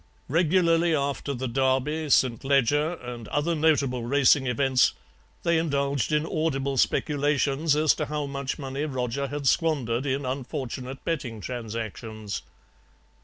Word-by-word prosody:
"Regularly 165 +1 +3
after 140 0 -2
the 130 +1 -3
Derby, 135 +5 0
St. 125 -4 +3
Leger, 140 +4 +2
and 120 -6 -8
other 150 +4 0
notable 145 -6 +2
racing 135 +2 +4
events 130 +1 +3 0.5
they 170 -1 +3
indulged 140 -5 0
in 150 +1 +2
audible 140 -4 -1
speculations 145 +1 +1
as 155 0 +4
to 150 - -3
how 150 0 -2
much 140 -1 -4
money 140 +1 -3
Roger 130 -1 -2
had 145 0 -3
squandered 135 -6 +1
in 135 +1 -1
unfortunate 130 0 -5
betting 130 -9 -3
transactions. 110 -2 -5
140 Hz, 125 wpm, -26 LUFS, 125-150 Hz, 0.5 s, racing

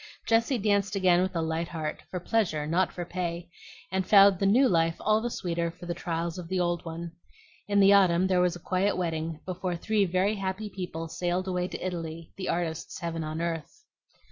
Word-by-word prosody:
Jessie 230 +3 +2
danced 200 -2 +1
again 180 -2 +4
with 185 0 -1
a 165 - 0
light 160 +1 -2
heart, 155 -3 -4
for 180 - -4
pleasure, 175 -6 0
not 175 +5 +1
for 175 - -5
pay, 175 -1 -4 0.4
and 190 0 0
found 195 -1 +6
the 195 - +2
new 250 +7 +5
life 165 -5 +2
all 215 +1 +2
the 240 - -2
sweeter 170 -5 -2
for 170 - -11
the 175 - -2
trials 170 0 -3
of 175 - -7
the 185 +1 -1
old 175 -1 0
one. 165 0 -6 0.6
In 205 0 +2
the 195 0 +7
autumn 185 -2 +5
there 185 -1 +3
was 180 -1 +2
a - - -8
quiet 185 +3 0
wedding, 165 -3 -2
before 185 -1 -3
three 210 +3 +1
very 185 +3 +1
happy 195 +2 -3
people 175 -3 -5
sailed 175 +3 -2
away 180 -1 -1
to - - -6
Italy, 165 -2 -5
the 190 - -4
artist's 165 -2 -2
heaven 165 -2 -3
on 155 +1 -4
earth. 170 - -4
180 Hz, 205 wpm, -28 LUFS, 170-195 Hz, 0.6 s, the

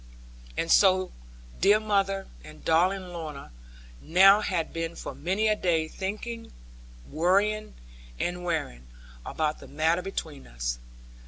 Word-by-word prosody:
And 165 - 0
so 185 -2 +5 0.5
dear 205 +3 +5
mother 195 -2 0 0.2
and 155 0 -13
darling 180 +3 +2
Lorna 155 - -7 0.5
now 195 +5 +6
had 180 -6 -2
been 165 0 -3
for - - -6
many 190 +7 0
a 215 - +3
day 165 -5 +1
thinking, 215 +6 -5 0.6
worrying, 200 +6 +1 0.4
and 180 0 -2
wearing, 150 - -3 0.4
about 155 - -2
the - - -12
matter 160 +4 +1
between 160 -6 -6
us. - - -3
180 Hz, 120 wpm, -27 LUFS, 160-195 Hz, 0.6 s, now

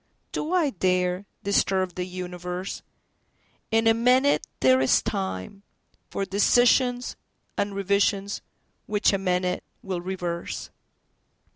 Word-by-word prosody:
Do 310 - -3
I 340 -6 +2
dareDisturb 185 0 0
the 180 +1 -4
universe? 180 0 -5 0.9
In 225 0 +2
a 225 - +6
minute 250 +5 +3
there 130 0 +5
is 130 - +4
timeFor 95 - -5
decisions 245 +4 +3 0.4
and 200 0 -1
revisions 200 0 +1 0.5
which 210 0 +2
a 195 - +1
minute 180 -1 0 0.2
will 185 -3 -3
reverse. 175 -2 -4
195 Hz, 100 wpm, -26 LUFS, 180-210 Hz, 0.9 s, a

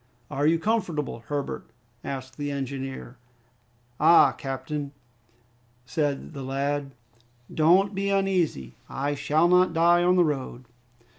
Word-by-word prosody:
"Are 145 +1 +1
you 165 +1 +4
comfortable, 165 - -1
Herbert?" 145 -2 -4 0.4
asked 130 -1 -6
the 145 -1 -3
engineer. 135 -2 -5 0.8
"Ah, 165 +3 +6
captain," 140 +1 -5 0.9
replied 145 +3 -2
the 140 - -7
lad, 135 +1 -2 0.6
"don't 185 +6 +4
be 200 +1 -1
uneasy, 185 - 0 0.2
I 140 +2 -2
shall 150 +4 +2
not 180 -1 +4
die 170 +1 +4
on 180 +1 +4
the 180 -2 +4
road!" 130 -4 -4
145 Hz, 120 wpm, -26 LUFS, 135-170 Hz, 0.9 s, Ah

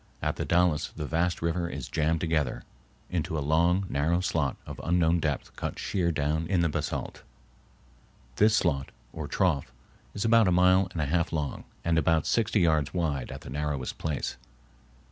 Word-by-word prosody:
At - - -1
the - - -2
Dalles 85 -3 +2
the 75 - -4
vast 85 +3 0
river 85 +1 0
is - - -5
jammed 80 +1 0
together 80 -6 0 0.5
into 80 -2 -1
a 70 -2 -2
long, 85 +5 +3
narrow 80 +4 +1
slot 80 -7 0
of - - -8
unknown 85 0 +2
depth 75 -4 -2
cut - - -4
sheer 90 -3 0
down 80 +1 -1
in 90 -2 +2
the 85 - +2
basalt. - - -3 1.2
This 105 +1 +5
slot, 70 -9 +1 0.2
or 80 -2 -5
trough, 75 -10 0 0.4
is 100 - -2
about 115 -2 +5
a - - +3
mile 90 +1 +4
and 80 - -2
a - - 0
half 85 +3 0
long 75 -4 -3 0.2
and 85 -1 +3
about 80 0 +2
sixty 110 -3 +2
yards 80 -2 +2
wide 75 -7 -1
at - - -7
the - - -9
narrowest 75 -2 -3
place. 75 -3 -3
80 Hz, 175 wpm, -28 LUFS, 75-90 Hz, 1.2 s, This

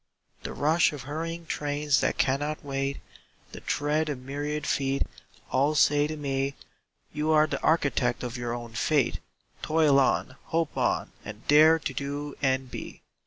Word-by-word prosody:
The - - -6
rush 160 +2 +3
of 140 -3 -7
hurrying 165 +4 -5
trains 145 -1 0
that - - 0
cannot 145 +3 0
wait, 135 0 -2 0.5
The - - -9
tread 150 +2 0
of 145 - -2
myriad 145 +3 -4
feet, 135 0 +1 0.5
all 140 +4 +2
say 145 0 +4
to 155 0 -5
me: 135 -1 -2 0.6
"You 150 +1 -1
are 155 -1 +5
the 155 - -4
architect 140 -7 +1
of 120 0 -4
your 120 -1 -3
own 120 -1 -8
fate; 140 +3 +1 0.4
Toil 155 -3 +4
on, 130 0 +1
hope 165 -1 -1
on, - - 0
and 105 +1 -10
dare 155 +2 +7
to 150 -4 -4
do 145 +2 -4
and 130 -2 0
be." - - -8
145 Hz, 160 wpm, -27 LUFS, 135-155 Hz, 0.6 s, dare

